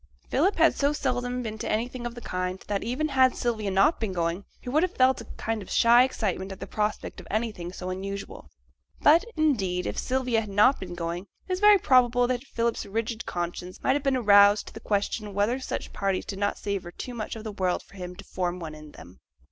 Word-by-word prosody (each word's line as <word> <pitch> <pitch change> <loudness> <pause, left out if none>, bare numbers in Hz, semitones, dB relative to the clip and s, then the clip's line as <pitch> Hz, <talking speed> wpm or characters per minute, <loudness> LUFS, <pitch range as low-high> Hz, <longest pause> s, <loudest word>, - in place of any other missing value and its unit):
Philip 370 +9 +2
had 325 0 +5
so 285 +1 +1
seldom 250 -3 -2
been 220 -1 -5
to - - -3
anything 240 +2 -2
of 240 - -8
the 240 - -8
kind, 180 -2 -3
that, 200 -1 -1
even 280 +6 -1
had 260 -2 +4
Sylvia 220 -4 -1
not 195 - +3
been 215 -4 -2
going, 170 +2 -1
he - - -16
would 290 +5 +2
have 365 0 -1
felt 260 -1 +3
a - - -10
kind 225 -1 -2
of 190 - -10
shy 235 +1 +6
excitement 200 -7 -2
at 190 - -8
the - - -5
prospect 210 0 -3
of - - -12
anything 210 -6 -2
so 185 0 -5
unusual. 195 +1 -6 0.5
But, 315 +5 +6
indeed, 200 -13 +1
if - - -3
Sylvia 255 -3 0
had 210 - -7
not 210 +7 +4
been 180 -2 -7
going, 175 +2 -4 0.2
it 370 - -1
is 365 - -1
very 415 0 +7
probable 250 -6 +4
that 250 0 -1
Philip's 230 -2 -1
rigid 225 +2 -3
conscience 175 +1 -4
might 265 - +3
have 290 - 0
been 270 -2 +1
aroused 205 -2 +6
to - - -18
the - - -8
question 205 -1 -2
whether 215 +6 +1
such 260 - -5
parties 195 -2 -1
did 195 -2 -6
not 205 0 0
savour 200 -4 -3
too 245 +7 -7
much 225 -2 -5
of 220 - -8
the 220 - -5
world 185 -3 -1
for - - -22
him 180 -1 -7
to 200 - -11
form 180 -1 -3
one 160 -3 -6
in 155 -1 -12
them. 90 +3 -14
215 Hz, 230 wpm, -27 LUFS, 190-250 Hz, 0.5 s, very